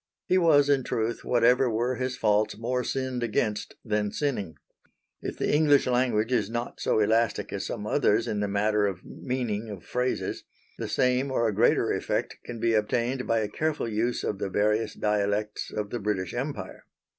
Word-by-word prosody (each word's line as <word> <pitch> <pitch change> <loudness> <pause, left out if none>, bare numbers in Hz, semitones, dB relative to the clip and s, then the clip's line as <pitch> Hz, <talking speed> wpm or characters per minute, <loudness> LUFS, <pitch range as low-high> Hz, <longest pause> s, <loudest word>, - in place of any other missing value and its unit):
He 185 - +3
was 150 -5 +5
in 140 -2 +3
truth, 115 0 -2
whatever 125 +1 +3
were 120 +3 0
his 130 -1 -2
faults, 105 0 +2
more 125 +3 -1
sinned 130 -1 -2
against 110 -2 -1
than 105 -2 0
sinning. 110 - -2 0.7
If - - -5
the - - 0
English 150 -2 +4
language 125 -3 +1
is 120 -5 +1
not 120 +1 -4
so - - +1
elastic 110 +2 +1
as - - -3
some 105 - -5
others 110 -2 +2
in 105 - -1
the 105 - 0
matter 105 +1 +2
of 95 -2 -5
meaning 115 -4 -3
of 100 -4 -8
phrases, 125 +1 -2 0.4
the - - -3
same 125 +2 +2
or 120 -3 +1
a 110 - 0
greater 110 +4 +3
effect - - -2
can 120 -1 -7
be 115 +1 +2
obtained 120 +4 0
by 115 -1 +2
a 105 - -1
careful 155 +4 -2
use 115 +2 -1
of 100 - -2
the - - -2
various 105 +2 +1
dialects 105 0 -1
of 105 -1 -4
the 120 - -2
British 95 -4 -2
Empire. 135 +4 -5
115 Hz, 180 wpm, -27 LUFS, 105-125 Hz, 0.7 s, was